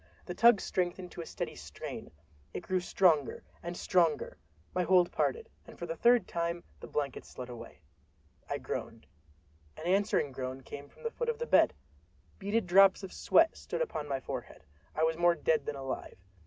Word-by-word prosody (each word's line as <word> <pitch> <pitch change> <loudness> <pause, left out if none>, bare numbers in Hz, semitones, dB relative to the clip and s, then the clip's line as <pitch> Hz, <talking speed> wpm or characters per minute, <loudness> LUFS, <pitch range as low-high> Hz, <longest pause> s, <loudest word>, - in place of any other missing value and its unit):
The 180 - -4
tug 230 +3 +6
strengthened 180 -1 -2
to - - -6
a 165 - -8
steady - - -4
strain—it 75 0 -9
grew 185 +1 0
stronger 170 -5 +2 0.2
and 175 +1 -5
stronger. 170 -4 +2 0.4
My 180 - +1
hold 180 0 +4
parted, 460 -1 0 0.2
and - - -12
for - - -5
the - - -4
third 240 -4 +4
time 170 0 -2 0.2
the - - -9
blankets 140 -3 -3
slid 125 -1 -8
away. 120 -1 -10 0.7
I - - -1
groaned. 115 - -5 0.7
An 155 - -8
answering 190 -6 +2
groan 130 0 -5
came 140 +2 -9
from - - -19
the 465 - -2
foot 480 0 -2
of 465 - -1
the 475 - -3
bed! - - +5 0.6
Beaded 205 +2 0
drops 195 +2 +6
of 190 - -7
sweat 325 0 +4
stood - - -2
upon 150 - -4
my 135 -2 -1
forehead. 125 - -7 0.3
I 155 - +1
was 160 0 +2
more 175 0 +4
dead 155 -3 +1
than 145 - -2
alive. 135 -1 -5
175 Hz, 180 wpm, -31 LUFS, 140-195 Hz, 0.7 s, tug